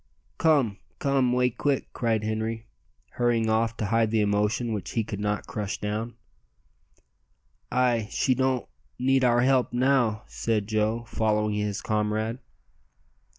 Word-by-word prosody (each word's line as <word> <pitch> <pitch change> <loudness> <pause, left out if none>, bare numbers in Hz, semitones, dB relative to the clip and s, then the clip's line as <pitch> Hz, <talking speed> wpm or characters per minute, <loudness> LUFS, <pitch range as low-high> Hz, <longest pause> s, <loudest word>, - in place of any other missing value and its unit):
"Come 140 -11 +3 0.2
come 135 -3 +2
'way 125 0 +2
quick," 140 +3 -1
cried 110 -3 0
Henri, 110 +1 -2 0.5
hurrying 115 -2 +1
off 115 +1 +1
to 110 - -2
hide 115 +1 +2
the 110 0 +2
emotion 105 +3 +1
which 105 - -5
he 115 - +1
could 105 -1 -6
not 105 0 -1
crush 105 -3 -4
down. 110 +3 -3 1.6
"Ay, 120 -4 +2
she 130 - +1
don't 130 -1 0 0.3
need 135 +1 +2
our 120 -1 +4
help 130 0 +3
now," 120 -4 +2
said 110 -3 -1
Joe, 110 +2 0
following 105 -2 0
his 105 -1 -2
comrade. 110 +2 -1
115 Hz, 135 wpm, -26 LUFS, 105-125 Hz, 1.6 s, our